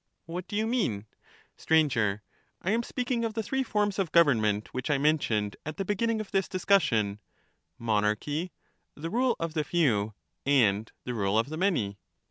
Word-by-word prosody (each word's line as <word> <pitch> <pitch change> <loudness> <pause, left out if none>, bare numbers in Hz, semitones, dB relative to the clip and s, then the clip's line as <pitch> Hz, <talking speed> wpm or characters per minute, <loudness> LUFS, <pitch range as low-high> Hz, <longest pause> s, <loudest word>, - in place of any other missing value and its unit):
What 175 +2 -6
do 205 - -6
you 215 +1 +1
mean? 190 - 0 0.5
Str, 160 - +1
I 115 -10 +2 0.5
am 230 +2 +2
speaking 245 0 -2
of 225 -2 -2
the 225 - -1
three 265 +4 -1
forms 210 -5 0
of 185 -5 0
government, 110 -11 +3
which 130 +2 -3
I 145 - +3
mentioned 125 -9 +1
at 155 0 -6
the 195 - -2
beginning 220 +3 0
of 215 - -6
this 195 -1 +1
discussion 115 - +2 0.3
— - - -43 0.2
monarchy, 115 - 0 0.4
the 165 +3 -5
rule 245 +1 +2
of 165 -1 -3
the 155 -2 0
few, 115 - +1 0.3
and 110 -6 +3
the 125 - -4
rule 100 -2 +1
of 115 +5 +1
the 155 - -4
many. 135 - 0
155 Hz, 175 wpm, -28 LUFS, -, 0.5 s, government